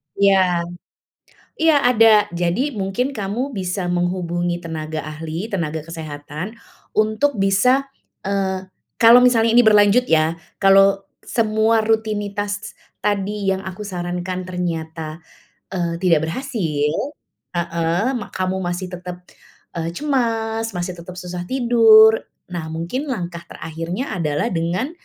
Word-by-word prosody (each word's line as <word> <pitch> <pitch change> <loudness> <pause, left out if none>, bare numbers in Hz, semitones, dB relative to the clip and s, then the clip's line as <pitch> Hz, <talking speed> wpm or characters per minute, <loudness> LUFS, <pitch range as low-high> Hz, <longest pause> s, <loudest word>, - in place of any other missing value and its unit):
Iya. 190 -3 +3 1.0
Iya 325 -1 +5 0.2
ada, 225 -2 +5 0.2
jadi 175 +11 0
mungkin 200 +7 -1
kamu 230 +4 -3
bisa 180 0 -2
menghubungi 175 -1 -1
tenaga 155 -1 -4
ahli, 160 +6 -6
tenaga 160 -5 -2
kesehatan 155 +4 -7 0.4
untuk 220 +6 +1
bisa 250 +8 +3 0.3
eee, 190 -1 -2 0.3
kalau 235 +2 +9
misalnya 235 -2 +4
ini 240 +1 +5
berlanjut 210 +3 +5
ya, 160 +1 +2 0.2
kalau 195 0 +5 0.2
semua 220 0 +2
rutinitas 205 -2 -2 0.2
tadi 205 0 -1
yang 190 0 0
aku 190 +2 -7
sarankan 180 -1 -4
ternyata, 165 -3 -4 0.5
eee, 170 -2 -2
tidak 165 -4 +3
berhasil 165 - -1 0.6
heeh, 170 +2 -1
mak 210 - -8
kamu 185 0 -1
masih 175 +1 -3
tetap, 180 0 -7 0.6
eee, 165 0 -2
cemas, 225 -5 -1
masih 175 0 -4
tetap 170 +2 -9
susah 180 0 -5
tidur. 225 -2 +6 0.3
Nah 170 -3 -4
mungkin 175 - -3
langkah 175 -6 -5
terakhirnya 165 - -5
adalah 150 -3 0
dengan 175 - -1
190 Hz, 115 wpm, -20 LUFS, 170-220 Hz, 1.0 s, kalau